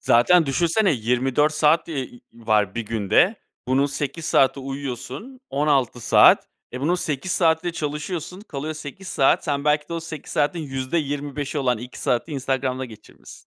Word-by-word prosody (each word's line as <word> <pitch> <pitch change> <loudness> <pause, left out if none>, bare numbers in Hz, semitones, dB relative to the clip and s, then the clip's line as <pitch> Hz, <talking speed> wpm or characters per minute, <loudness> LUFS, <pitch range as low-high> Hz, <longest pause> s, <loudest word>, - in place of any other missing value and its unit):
Zaten 160 +8 +4
düşünsene 170 - +2
24 130 +5 +1
saat, 150 +2 +3
eee, 130 -6 -5
var 110 -4 0
1 115 - -2
günde. 115 - +2 0.3
Bunun 135 +2 +3
8 145 +3 -4
saati 135 -3 +3
uyuyorsun, 135 - -6
16 140 -4 +1
saat. 110 - +5 0.2
E, 125 - -5
bunun 160 +6 +1
8 165 0 -2
saati 160 -2 +2
de 175 - -1
çalışıyorsun, 160 +4 -4
kalıyor 155 -6 -5
8 155 +5 -9
saat. 135 - +2
Sen 140 -1 -1
belki 150 0 +1
de - - -6
o 165 - -2
8 160 -3 -8
saatin 145 +4 +1
%25'i 145 +1 -3
olan 125 -4 +1
2 125 +2 -9
saati 125 +6 -1
Instagram'da 130 -1 -1
geçirmişsin. 110 -4 -14
145 Hz, 155 wpm, -23 LUFS, 130-160 Hz, 0.3 s, saat